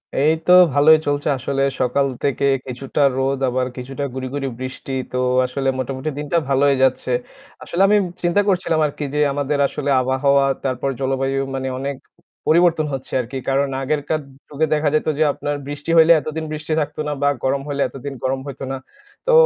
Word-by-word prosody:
এই 150 +3 +3
তো - - +3 0.2
ভালোই 155 +2 +6
চলছে 145 0 0
আসলে। 135 +2 -2 0.2
সকাল 130 +3 +2 0.2
থেকে 140 0 0 0.2
কিছুটা 130 +3 -3 0.2
রোদ 135 0 0
আবার 125 +1 0
কিছুটা 135 +3 -5
গুড়ি, 130 0 -4
গুড়ি, 140 -1 -2
বৃষ্টি। 130 +1 -6 0.2
তো 125 - -2 0.3
আসলে 135 +2 -3
মোটামুটি 130 +3 -3
দিনটা 150 +3 -1
ভালোই 140 +1 +4
যাচ্ছে। 130 -1 +1 0.5
আসলে 175 - -2
আমি 210 +1 +5 0.3
চিন্তা 175 +4 +3
করছিলাম 180 -4 +1
আরকি 145 +1 -6
যে 150 - 0
আমাদের 145 +1 -1
আসলে 145 0 -4
আবহাওয়া 135 +2 +2 0.2
তারপর 130 0 -1
জলবায়ু 135 0 0 0.2
মানে 130 0 -3
অনেক 140 +1 -3 0.5
পরিবর্তন 165 -1 +4
হচ্ছে 135 -1 -6
আরকি। 125 +3 -6
কারণ 140 +1 +2
আগেরকার 150 +2 -1 0.3
যুগে 150 +2 0
দেখা 150 0 +2
যেত 155 - 0
যে 155 - +3
আপনার 145 +1 -3
বৃষ্টি 145 +2 -4
হইলে 165 +1 +7
এতদিন 155 +2 -4
বৃষ্টি 155 +1 -5
থাকত 150 0 -5
না। - - -1
বা 145 - +3 0.2
গরম 135 +1 +1
হইলে 140 -1 -2
এতদিন 135 +1 -7
গরম 130 +1 0
হইত 140 - -8
না। - - -2 0.5
তো - - +2
140 Hz, 175 wpm, -20 LUFS, 135-150 Hz, 0.5 s, হইলে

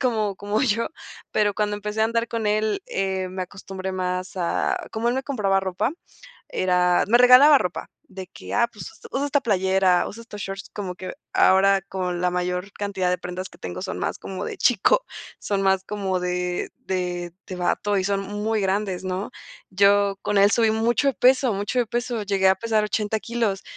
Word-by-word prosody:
como 215 -6 0
como 205 +2 -2
yo. 230 -3 +1 0.4
Pero 205 -1 +1
cuando 210 -1 -1
empecé 210 +1 -4
a 220 - +5
andar 230 +1 0
con 225 -2 -2
él, 215 0 0
eh, 190 -1 -2
me 185 0 -4
acostumbré 190 0 -6
más 185 0 -3
a 175 -2 -1
como 225 +1 -1
él 240 - +1
me 265 - -1
compraba 200 -9 +1
ropa, 190 - -1 0.6
era 180 -1 +2
me 240 +3 +5
regalaba 255 +4 +8
ropa 180 -7 -4 0.2
de 190 -1 -8
que, - - -9
"Ah, 235 -1 +4
pues, 210 - -8
usa 330 - -15
usa 280 +2 0
esta 285 0 +1
playera, 190 -3 +2
usa 230 +3 -9
estos 210 -3 -10
shorts", 195 0 -6
como 190 -3 -5
que 185 +1 -7 0.2
ahora 195 0 +5
con 180 -2 -3
la 180 - +2
mayor 180 +2 -2
cantidad 195 -3 -2
de 180 - 0
prendas 185 +1 -6
que - - -17
tengo 90 - -6
son - - -4
más - - -2
como 190 - -6
de - - -5
chico, 385 - +3 0.3
son 200 -1 -2
más 190 -1 +2
como 195 -3 -2
de 180 0 -2 0.2
de 180 -2 -2
de 185 - -6
bato 200 +3 0
y 185 - -1
son 200 0 0
muy 205 +2 -2
grandes, 190 -1 -1
¿no? 185 +2 -3 0.4
Yo 200 +1 +3
con 205 - +1
él 200 +1 +6
subí 225 0 +3
mucho 235 +5 +2
peso 255 0 +4
mucho 205 +5 -2
de 240 - 0
peso, 240 0 -2
llegué 195 -2 +2
a 190 - +5
pesar 220 +1 0
80 210 0 -1
kilos 225 -3 -1
200 Hz, 195 wpm, -23 LUFS, 185-220 Hz, 0.6 s, regalaba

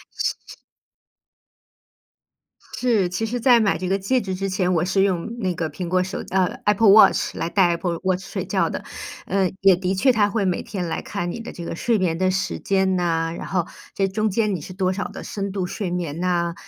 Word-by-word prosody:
是， - - 0
是。 - - -11 2.2
是， 225 -8 +2
其 180 +5 -2
实 240 +2 -2
在 245 -1 +6
买 210 -3 +2
这 185 0 -3
个 195 +1 +1
戒 245 +7 +1
指 190 -3 -4
之 195 +1 -2
前， 185 -1 0
我 170 0 +2
是 190 +1 +2
用 185 -3 0
那 185 -6 -1
个 160 -2 -3
苹 175 +4 -5
果 185 +1 +2
手 190 - -4
呃 185 -1 +3 0.2
，Apple 210 +1 +4
Watch， 215 +2 +6
来 165 - -2
戴 185 -1 +3
Apple 170 0 -1
Watch 185 0 0
睡 - - -4
觉 - - +1
的， - - -5 0.4
呃， 190 -2 +1
也 195 -1 +7
的 185 +1 -1
确 255 +7 +4
它 210 -2 +3
会 205 -1 -1
每 185 -2 0
天 185 -4 -4
来 165 - -3
看 175 -4 -4
你 230 - -6
的 230 - -7
这 170 - -8
个 - - -4
睡 230 +6 +1
眠 175 -3 0
的 185 0 +2
时 190 +1 -2
间 190 -1 +1
呐， 165 -2 0
然 - - -6
后 180 -3 -1 0.3
这 195 - +1
中 215 +3 0
间 210 0 +1
你 170 - -4
是 185 - -9
多 185 -1 0
少 195 - -3
的 - - -9
深 200 -1 -4
度 190 -3 -2
睡 185 0 -4
眠 170 -3 -3
呐， 170 -2 0
190 Hz, 295 characters per minute, -22 LUFS, 180-200 Hz, 2.2 s, 也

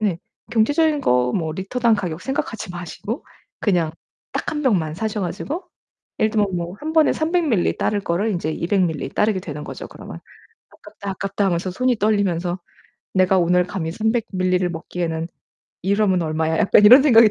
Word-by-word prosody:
네 200 -6 0 0.3
경제적인 290 +7 +2
거 125 - +2
뭐 160 -4 -1
리터당 225 +7 +1
가격 175 -5 -3
생각하지 230 -7 -3
마시고 175 - -6 0.4
그냥 175 -6 +1 0.4
딱 - - -2
1 300 -1 -3
병만 175 - +1
사셔 215 +3 -2
가지고 205 - -4 0.5
예를 220 - +2
들면 205 -4 0
뭐 175 +1 -4
1 315 +1 -4
번에 315 -1 +5
300ml 330 +1 0
밀리 210 -9 +1
따를 205 - 0
거를 195 +4 -1
인제 175 -5 -2
200ml 185 +5 0
밀리 160 -5 -2
따르게 210 +1 +1
되는 150 -4 -7
거죠, - - -7
그러면. 80 - -10 0.5
"아깝다, 200 - -10
아깝다." 195 +1 -2
하면서 180 0 0
손이 250 +5 +1
떨리면서 190 -4 0 0.6
'내가 185 0 +4
오늘 180 +1 +3
감히 170 -4 -3
300ml를 220 +3 0
밀리를 185 -1 +1
먹기에는 165 -1 -4 0.5
이러면 195 -1 +2
얼마야?' 160 0 0
약간 205 - +5
이런 250 +6 +9
생각이 230 -6 +7
190 Hz, 360 characters per minute, -21 LUFS, 170-220 Hz, 0.6 s, 이런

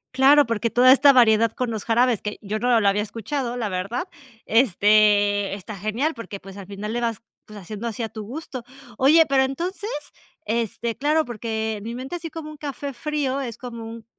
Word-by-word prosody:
Claro, 280 +2 +6
porque 230 0 -1
toda 250 +3 +6
esta 280 +1 +7
variedad 230 -3 +5
con 250 -2 -2
los 215 -2 -5
jarabes, 235 -1 +2
que 210 0 -5
yo 215 +1 -3
no 245 0 +3
lo 200 - +2
había 205 +1 +1
escuchado, 240 +4 -4
la 230 -4 -2
verdad, 200 - -3 0.4
este, 205 -3 +3
está 200 +1 -7
genial 225 - -1
porque 230 -5 -8
pues 195 0 -11
al 195 -2 -9
final 205 +1 -6
le 240 - -1
vas, 230 -2 -2 0.2
pues, 215 - -12
haciendo 210 +4 -6
así 230 +1 -4
a 220 - -3
tu 215 -1 -7
gusto. 255 -1 -7 0.3
Oye, 310 +5 +6
pero 270 -1 +4
entonces, 360 - -3 0.6
este 230 +1 -2
claro 300 +5 +2
porque 220 -2 -3
mi 230 +3 -6
mente, 265 +8 -5
así 330 -1 -7
como 315 -1 -8
un 305 - -11
café 285 -1 -5
frío, 275 +1 -2
es 235 -5 -5
como 235 -2 -8
un 225 0 -9
230 Hz, 200 wpm, -23 LUFS, 215-265 Hz, 0.6 s, esta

